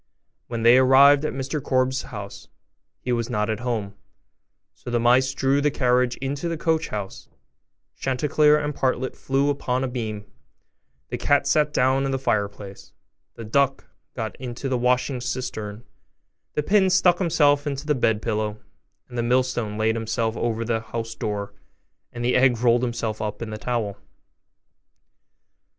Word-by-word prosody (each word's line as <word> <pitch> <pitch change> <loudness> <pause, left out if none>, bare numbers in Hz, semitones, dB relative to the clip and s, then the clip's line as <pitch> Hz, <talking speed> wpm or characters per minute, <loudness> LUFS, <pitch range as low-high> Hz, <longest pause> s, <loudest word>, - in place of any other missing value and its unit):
When 115 -1 -4
they 120 +2 +7
arrived 140 +3 +6
at - - -2
Mr 135 +3 -3
Korbes's 130 0 0
house, - - -8 0.5
he 125 - -3
was 115 -1 -1
not 105 -2 0
at 110 - -3
home; 115 -5 -3 0.8
so - - -10
the 120 0 +1
mice 125 +3 +4
drew 135 +1 +1
the 150 - +3
carriage 125 -3 +1
into 140 +5 -3
the 165 - -3
coach 160 0 0
house, 100 -2 -6 0.7
Chanticleer 150 +3 +3
and 150 0 -2
Partlet 130 -1 -1
flew 140 +2 0
upon 130 -2 -1
a - - 0
beam, 110 -4 -5 0.8
the 120 - -4
cat 145 +2 +2
sat 150 -1 +2
down 130 0 +2
in - - -1
the 135 - 0
fireplace, 100 -5 -3 0.4
the 115 - -8
duck 135 +4 +1 0.3
got 110 -3 -4
into 125 +1 -5
the 130 - 0
washing 125 +1 +1
cistern, 120 -4 -5 0.7
the 150 - 0
pin 190 +3 +3
stuck 180 -1 +4
himself 150 -5 +2
into 140 0 -3
the 150 - +2
bed 110 -5 +1
pillow, 110 -2 -2 0.5
the 120 -1 -3
millstone 120 -3 0
laid 110 +1 +2
himself 115 0 -2
over 115 -1 -2
the 115 -1 0
house 115 0 -5
door, 100 -2 -4 0.6
and 120 0 -5
the 125 - +2
egg 125 -2 +4
rolled 120 0 +3
himself 115 -3 -3
up 105 -1 -4
in 110 - -6
the 110 - -5
towel. 110 -5 -2
125 Hz, 160 wpm, -24 LUFS, 115-135 Hz, 0.8 s, they